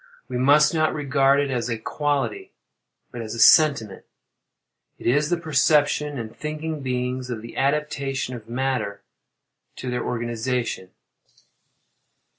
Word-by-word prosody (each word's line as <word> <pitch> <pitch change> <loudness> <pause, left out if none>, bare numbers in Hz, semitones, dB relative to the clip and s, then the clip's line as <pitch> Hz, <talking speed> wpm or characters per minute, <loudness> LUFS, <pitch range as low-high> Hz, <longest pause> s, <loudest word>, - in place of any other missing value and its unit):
We 125 - -4
must 150 +4 +5
not 155 -1 +1
regard 140 -1 +2
it 140 -1 0
as 125 -1 -2
a 115 - -1
quality, 145 - -2 0.6
but 120 - -6
as 110 0 -6
a - - -6
sentiment:—it 115 -6 +1
is 145 +5 +2
the 175 - +1
perception, 150 -2 +2
in 115 -2 -5
thinking 155 +4 -5
beings, 125 0 -3
of 115 -3 -5
the 115 - -10
adaptation 140 -2 -1
of 115 -2 -9
matter 125 -5 -2 0.7
to 125 - -5
their 125 - -2
organization. 120 -4 -3
135 Hz, 125 wpm, -23 LUFS, 120-150 Hz, 0.7 s, must